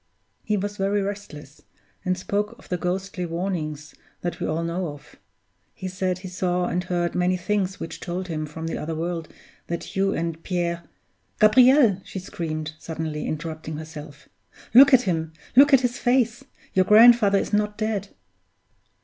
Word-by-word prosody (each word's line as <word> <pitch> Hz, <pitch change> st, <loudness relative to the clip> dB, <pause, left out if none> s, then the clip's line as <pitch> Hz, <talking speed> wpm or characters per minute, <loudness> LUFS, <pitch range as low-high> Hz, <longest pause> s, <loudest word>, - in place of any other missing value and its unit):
"He 210 Hz, -1 st, -1 dB
was 205 Hz, +1 st, -3 dB
very 195 Hz, +1 st, +1 dB
restless, 195 Hz, -8 st, -7 dB, 0.4 s
and 185 Hz, 0 st, 0 dB
spoke 205 Hz, +4 st, -2 dB
of -, -, -18 dB
the 180 Hz, -, -1 dB
ghostly 185 Hz, +1 st, -3 dB
warnings 165 Hz, -4 st, -4 dB, 0.3 s
that 175 Hz, -, -4 dB
we -, -, -2 dB
all 160 Hz, +2 st, -1 dB
know 170 Hz, +2 st, -2 dB
of; 145 Hz, -2 st, -11 dB, 0.6 s
he 185 Hz, -, -6 dB
said 185 Hz, -1 st, -2 dB
he 185 Hz, +1 st, -8 dB
saw 180 Hz, -1 st, -1 dB
and 180 Hz, 0 st, -1 dB
heard 175 Hz, -1 st, -1 dB
many 180 Hz, +1 st, +1 dB
things 190 Hz, +1 st, -1 dB
which 165 Hz, -, -6 dB
told 180 Hz, +1 st, -4 dB
him 155 Hz, -3 st, -3 dB
from 160 Hz, +2 st, -7 dB
the 165 Hz, -, -3 dB
other 160 Hz, +1 st, -4 dB
world 165 Hz, 0 st, -4 dB, 0.4 s
that 170 Hz, 0 st, -5 dB
you 195 Hz, 0 st, +2 dB
and 165 Hz, -2 st, -3 dB
Pierre 170 Hz, -2 st, -2 dB, 0.5 s
Gabriel!" 235 Hz, -1 st, +6 dB
she -, -, -8 dB
screamed, 155 Hz, -4 st, -4 dB
suddenly 160 Hz, -2 st, -4 dB
interrupting 155 Hz, 0 st, -5 dB
herself, 150 Hz, -2 st, -10 dB, 0.5 s
"look 270 Hz, +3 st, +9 dB
at 255 Hz, -2 st, +6 dB
him! 160 Hz, -4 st, -2 dB, 0.2 s
Look 280 Hz, +3 st, +7 dB
at 270 Hz, -2 st, +7 dB
his 245 Hz, -1 st, -1 dB
face! 245 Hz, 0 st, +1 dB, 0.3 s
Your 185 Hz, 0 st, +3 dB
grandfather 220 Hz, -1 st, +7 dB
is 195 Hz, -, -2 dB
not 210 Hz, 0 st, +1 dB
dead!" 215 Hz, -2 st, -2 dB
180 Hz, 165 wpm, -24 LUFS, 165-205 Hz, 0.6 s, look